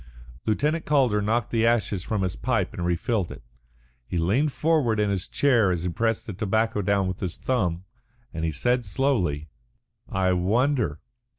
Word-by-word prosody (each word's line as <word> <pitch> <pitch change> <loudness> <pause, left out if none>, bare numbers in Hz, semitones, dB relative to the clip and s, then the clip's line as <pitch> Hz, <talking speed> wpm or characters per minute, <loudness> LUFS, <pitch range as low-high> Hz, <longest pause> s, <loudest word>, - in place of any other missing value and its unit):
Lieutenant 150 +9 +1
Calder 130 -8 +2
knocked 110 +2 0
the 115 -1 +1
ashes 110 -5 +1
from 105 -1 -1
his 90 - -2
pipe - - -1
and 85 - -4
refilled 90 +3 0
it. - - -10 0.6
He 90 - -3
leaned 110 - +2
forward 145 -8 +1
in 105 -1 +2
his 95 -2 -2
chair 120 -8 +3
as 85 -2 -1
he 90 - -1
pressed 115 +5 -1
the 105 - -6
tobacco 110 +2 0
down 100 -1 +1
with 95 0 -4
his 90 -4 -4
thumb, 90 -9 -1 0.5
and 80 -1 -4
he 80 - +1
said 125 - +1
slowly: 95 - 0 0.6
"I 95 -1 +1
wonder. 105 - +1
105 Hz, 170 wpm, -25 LUFS, 90-120 Hz, 0.6 s, chair